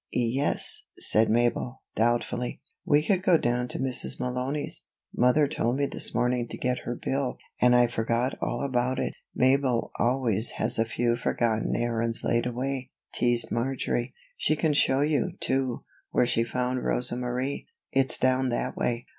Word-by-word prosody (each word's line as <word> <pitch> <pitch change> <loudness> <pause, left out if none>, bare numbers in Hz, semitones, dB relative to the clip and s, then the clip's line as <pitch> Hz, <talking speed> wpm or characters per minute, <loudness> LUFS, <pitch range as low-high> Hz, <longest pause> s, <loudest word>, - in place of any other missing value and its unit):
"Ye 120 +2 0
es," - - 0
said 110 +1 +2
Mabel, 120 +2 0
doubtfully. 120 +2 0 0.3
"We 150 +1 +3
could 190 -3 +2
go 180 -2 +5
down 125 -2 0
to - - -4
Mrs. 130 -1 -1
Malony's. 125 +4 -2 0.3
Mother 125 +4 +4
told 120 -2 0
me 140 +1 +1
this - - +2
morning 125 -1 +1
to - - -6
get 125 0 -1
her 120 - -2
bill, 135 0 -2 0.2
and 125 0 +6
I 120 0 +6
forgot 120 +2 -1
all - - -2
about 130 -1 0
it." - - -2 0.2
"Mabel 130 -2 +2
always 120 -3 +1
has - - 0
a 115 - +3
few 120 +2 0
forgotten 115 -2 0
errands 115 -1 -1
laid 120 +1 +1
away," 130 +1 -3 0.2
teased 120 -1 +1
Marjory. 120 0 -1 0.2
"She 155 - +1
can 155 0 +1
show 135 -1 +3
you, 155 +4 +1
too, 130 -2 -1 0.3
where - - +2
she 115 -1 +1
found 125 +1 -2
Rosa 125 -1 0
Marie 125 +3 -3 0.2
it's 135 -1 +2
down 130 0 +2
that 120 - -2
way." 120 0 -1
125 Hz, 165 wpm, -27 LUFS, 120-135 Hz, 0.3 s, and